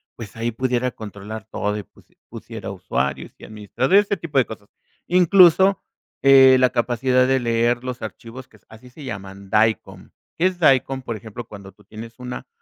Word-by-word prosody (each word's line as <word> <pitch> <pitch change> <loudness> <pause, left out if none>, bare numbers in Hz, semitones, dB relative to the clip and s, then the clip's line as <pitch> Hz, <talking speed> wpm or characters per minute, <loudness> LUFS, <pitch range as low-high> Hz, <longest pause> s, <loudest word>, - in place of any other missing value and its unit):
pues, 115 -3 -10
ahí 115 +1 -2
pudiera 125 +1 -1
controlar 105 -1 -9
todo 105 0 -2
y - - -4
pus - - -24 0.2
pusiera - - -9
usuarios, 70 0 -3
y - - -17
administrador, 110 - -2
este 205 0 +3
tipo 160 -4 -5
de 130 - +4
cosas. 105 -2 -11 0.4
Incluso, 185 +1 +5 0.4
eh, 135 -1 +7
la 130 - +4
capacidad 125 +1 +1
de 130 0 +2
leer 120 0 0
los 125 -1 -6
archivos, 125 +3 -9
que 110 - -22
así 120 +3 -15
se 145 - -13
llaman, 100 -5 -8
DICOM. 110 +1 0 0.3
¿Qué 170 - +1
es 185 -1 0
DICOM? 135 -3 +2
Por 115 -3 -5
ejemplo, 110 +2 -9
cuando 100 -2 -12
tú 105 - -24
tienes 110 +3 -11
una 125 0 -7
120 Hz, 175 wpm, -21 LUFS, 110-130 Hz, 0.4 s, eh